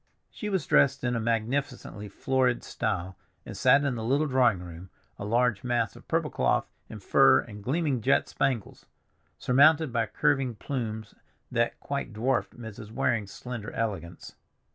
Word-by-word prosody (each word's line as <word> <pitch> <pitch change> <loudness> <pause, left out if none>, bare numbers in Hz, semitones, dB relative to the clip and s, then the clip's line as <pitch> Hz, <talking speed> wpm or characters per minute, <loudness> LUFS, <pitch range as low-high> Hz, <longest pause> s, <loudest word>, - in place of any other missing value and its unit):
She 210 - -5
was 190 -3 -1
dressed 140 -1 +3
in 125 -1 0
a - - 0
magnificently 115 -1 -2
florid 130 +3 0
style, 95 -3 -3 0.3
and - - -8
sat 140 +1 +4
in 140 -2 0
the 115 -2 -4
little 140 +6 +2
drawing 130 -7 +3
room 90 +1 -10 0.3
a 100 - -5
large 115 -1 +1
mass 120 -4 0
of - - -15
purple - - 0
cloth - - +1 0.2
and 105 -3 -9
fur 135 +3 +5
and 105 -3 -11
gleaming 140 -1 0
jet 130 - +2
spangles, 130 -7 -2 0.5
surmounted 145 +2 +4
by 115 -1 +1
curving 135 -4 +1
plumes, 110 -3 -5 0.4
that - - 0
quite - - -4
dwarfed 120 +4 -1
Mrs. 110 -2 -9
Waring's 110 -2 -1
slender 125 -3 -7
elegance. 95 -7 -4
120 Hz, 155 wpm, -28 LUFS, 105-135 Hz, 0.5 s, fur